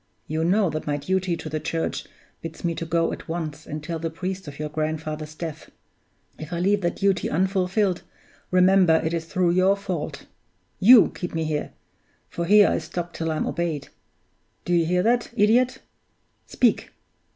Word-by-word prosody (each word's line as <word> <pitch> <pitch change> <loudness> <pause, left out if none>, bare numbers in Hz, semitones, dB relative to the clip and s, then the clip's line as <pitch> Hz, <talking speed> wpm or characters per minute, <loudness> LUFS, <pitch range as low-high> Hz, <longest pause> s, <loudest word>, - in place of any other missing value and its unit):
You 160 +1 -2
know 190 +1 +2
that 155 0 -5
my 145 -1 0
duty 185 +3 -1
to - - -7
the 155 0 -3
Church 165 +1 -3 0.4
bids 165 -1 -8
me 170 - +1
to 165 0 -5
go 165 +1 +1
at - - -9
once 160 -3 -5
and 150 0 -6
tell 165 +1 -4
the 165 +1 -2
priest 185 +2 -5
of 140 -1 -8
your 150 - -3
grandfather's 155 0 -4
death. 160 -2 -7 0.7
If 155 +1 -8
I 170 - -2
leave 200 +3 +2
that 175 -1 -1
duty 195 -2 +1
unfulfilled, 190 +2 +1 0.5
remember 185 -2 +5
it 160 - -1
is 165 -1 -2
through 175 +2 +1
your 185 +3 +3
fault! 180 -6 -5 0.5
You 230 +3 +8
keep 175 -3 -6
me 160 - 0
here 155 -1 -3 0.6
for 170 - -3
here 205 +3 +7
I - - 0
stop 175 0 -5
till 165 0 -3
I'm 155 -1 -1
obeyed. 165 -4 -3 0.8
Do 175 - 0
you 170 -2 +3
hear 180 +1 +2
that, 240 +2 +2
idiot? 240 +5 +3 0.7
Speak! - - +1
170 Hz, 175 wpm, -24 LUFS, 155-190 Hz, 0.8 s, You